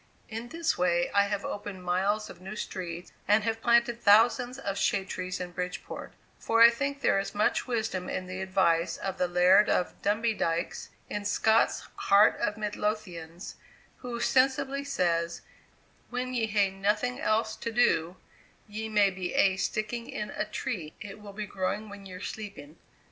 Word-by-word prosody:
In 225 +2 -6
this 330 - -1
way, 175 -1 +2
I 200 0 +4
have 200 0 -3
opened 200 -2 -6
miles 195 +4 0
of 175 - -12
new 190 +3 -7
streets, 175 -4 -6 0.2
and 210 +2 +4
have 225 0 -1
planted 235 0 +3
thousands 240 +4 +4
of 200 -8 -3
shade 195 -1 +1
trees 185 0 -4
in 180 -1 -5
Bridgeport; 180 +1 -6 0.3
for 230 0 +4
I 235 - +9
think 280 +3 -3
there 195 - +3
is 195 - -5
much 210 - +1
wisdom 220 -6 -2
in 185 - -3
the 185 +1 -6
advice 185 -3 +1
of 190 -1 -4
the 180 - +2
Laird 180 +4 +5
of 180 - +1
Dumbiedikes, 205 -6 0 0.2
in 205 0 -4
Scott's 220 +2 +2
"Heart 200 +1 +5
of 210 +1 -1
Mid 210 -1 -3
Lothian," 180 -6 -3 0.6
who 245 -2 -6
sensibly 270 +2 +2
says: 170 -10 -1 0.7
"When 250 +1 -3
ye 230 -3 +1
hae 205 -2 +2
naething 210 +6 0
else 220 0 +1
to 230 - -4
do, 185 -7 +2 0.5
ye 220 +1 -5
may 205 -2 +4
be 185 -1 -4
aye 190 -1 +4
sticking 215 +4 -3
in 210 -2 -4
a - - -2
tree; 210 - -4
it 205 -1 -9
will 205 -1 -9
be 210 +1 -4
growing 205 +2 -3
when 200 -1 -10
ye're 185 0 -9
sleeping." 195 -9 -7
205 Hz, 170 wpm, -29 LUFS, 185-225 Hz, 0.7 s, I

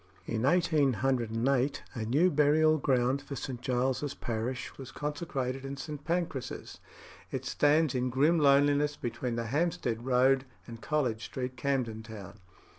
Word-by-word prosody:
In 110 -1 -2
1808 135 - +1
a 110 -2 -4
new 150 +11 +3
burial 155 +2 +4
ground 130 -1 +1
for 140 -1 -7
St. 130 -2 -5
Giles's 130 +3 -1
parish 120 +2 -4
was 135 -1 -8
consecrated 140 -4 -3
in 135 0 -5
St. 145 +1 -6
Pancras's. 170 -6 -3 0.5
It - - -4
stands 150 0 +3
in 125 0 0
grim 150 +7 +3
loneliness 145 +1 +4
between 120 -2 -3
the 115 0 -2
Hampstead 155 -8 0
Road 130 +1 +3 0.2
and 115 -1 -10
College 125 -7 -1
Street, 125 -1 -5
Camden 125 -4 -1
Town. 105 -3 -10
135 Hz, 135 wpm, -30 LUFS, 125-145 Hz, 0.5 s, burial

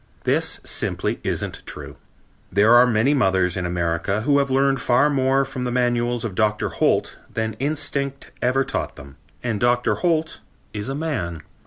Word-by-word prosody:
This - - 0
simply - - -2
isn't - - -2
true. - - -7 0.6
There 105 +5 +5
are 120 +1 +7
many 120 +4 +2
mothers 95 -8 +2
in 90 -2 -2
America 85 +3 -1
who 140 +4 +3
have 140 -1 0
learned 135 0 +2
far 125 +5 +3
more 135 0 +2
from 135 -1 -5
the 125 - -1
manuals 120 -1 0
of 110 - -4
Dr. 105 +2 +1
Holt - - 0
than 110 -1 -2
instinct 140 -1 -2
ever 130 +2 +2
taught - - -3
them 70 -1 -13 0.3
and 115 -4 -1
Dr. 120 +1 +2
Holt 165 -2 0 0.3
is 105 +3 -4
a 135 - -2
man. 95 - -3
120 Hz, 165 wpm, -22 LUFS, 105-135 Hz, 0.6 s, are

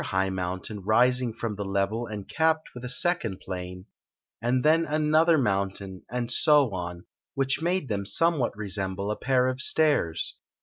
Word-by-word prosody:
high 95 0 0
mountain, 95 +3 -4
rising 125 +4 +2
from 115 0 -4
the 100 - -4
level 100 +4 -1
and 105 -3 -7
capped 160 0 0
with 125 - -9
a 125 - -4
second 125 - +1
plain; 90 0 -7 0.6
and 125 +2 0
then 160 +2 +5
another 155 +2 +3
moun 100 -7 +1
tain, 95 -1 -9
and 120 0 -3
so 145 -3 +4
on; 90 -1 -5 0.3
which 135 +2 0
made 175 -2 0
them 100 -3 -2
somewhat 155 - +2
resem 95 -2 -3
ble 100 +2 -3
a - - -1
pair 130 +1 +1
of 130 +1 0
stairs. 150 - +1
115 Hz, 170 wpm, -26 LUFS, 95-145 Hz, 0.6 s, then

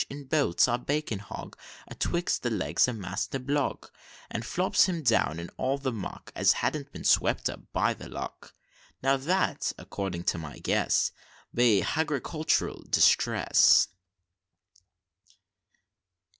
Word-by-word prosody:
in 140 +1 -8
bolts 135 - +2
our 120 0 0
bacon 140 -5 -2
hog 105 - -9 0.3
Atwixt 175 0 -1
the 120 - -1
legs 85 - +1
o' 125 - -2
Master 110 +5 -3
Blogg, 140 +2 -2 0.4
And 110 - -3
flops 180 +10 +2
him 170 -4 -2
down 115 - +2
in 85 - -6
all 135 +2 0
the 135 -2 -2
muck, 110 -5 -7
As - - +4
hadn't 140 -2 -2
been - - -9
swept - - +3
up - - -13
by - - +1
luck - - -8 0.5
Now 135 +1 +4
that, 180 +8 0
accordin' 95 -4 -5
to 85 - 0
my 75 -3 -8
guess, - - +1 0.4
Be 115 -5 +4
Hagricultural 155 0 -1
Distress." - - +5
130 Hz, 130 wpm, -28 LUFS, 105-150 Hz, 0.5 s, Distress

